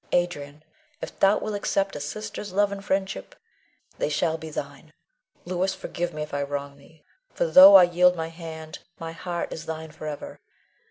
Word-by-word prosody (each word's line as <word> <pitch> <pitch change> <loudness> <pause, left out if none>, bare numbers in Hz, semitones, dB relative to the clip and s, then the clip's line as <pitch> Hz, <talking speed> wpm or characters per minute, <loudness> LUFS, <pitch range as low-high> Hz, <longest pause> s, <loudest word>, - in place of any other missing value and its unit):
Adrian, 155 -4 -1 0.4
if - - -8
thou 195 +2 +5
wilt 215 - -4
accept 195 -1 -1
a - - -4
sister's 205 +6 -6
love 200 +2 +2
and 200 0 -6
friendship, 190 - -2 0.6
they - - 0
shall 160 +2 0
be 160 0 -7
thine. 145 +1 -7 0.5
Louis, 185 +2 -1
forgive 175 -2 -4
me 155 -1 -4
if 150 - -10
I 140 - -1
wrong 140 0 -4
thee; 155 +2 -21 0.3
for - - +1
though 275 - +10
I 190 - +10
yield 180 +1 +4
my 160 -1 -4
hand, 160 -2 -9 0.2
my 165 0 -5
heart 170 +1 -4
is 165 0 -8
thine 160 -1 -5
forever. 150 -1 -7
165 Hz, 175 wpm, -25 LUFS, 150-190 Hz, 0.6 s, though